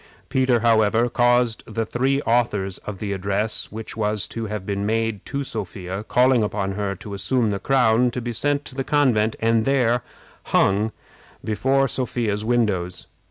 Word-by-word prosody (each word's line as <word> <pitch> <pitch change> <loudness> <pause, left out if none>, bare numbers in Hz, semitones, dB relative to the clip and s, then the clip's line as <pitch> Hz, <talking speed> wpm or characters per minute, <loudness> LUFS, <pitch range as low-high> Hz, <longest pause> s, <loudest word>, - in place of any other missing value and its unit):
Peter, 130 -3 +2
however, 115 0 +3
caused 120 -1 +2
the 115 -1 -1
three 135 +5 0
authors 105 -5 0
of 105 -2 -7
the 100 0 -3
address, 100 +3 -2
which 110 +1 -7
was 105 -2 -1
to 115 -1 -5
have 105 -2 -5
been 100 0 -2
made 115 -1 -1
to 140 0 -2
Sophia, 95 -4 -5
calling 125 +1 +3
upon 100 -2 -1
her 100 0 -2
to 100 +3 -9
assume 115 +3 0
the 100 - -2
crown, 125 -1 +3
to 120 - -4
be 120 0 -4
sent 145 +5 0
to - - -10
the 135 0 -2
convent, 125 -7 +2
and 115 0 +2
there 125 -2 +2 0.4
hung 105 +3 +2 0.5
before 135 +5 +1
Sophia's 115 -5 -2
windows. 105 -7 0
110 Hz, 160 wpm, -22 LUFS, 105-125 Hz, 0.5 s, however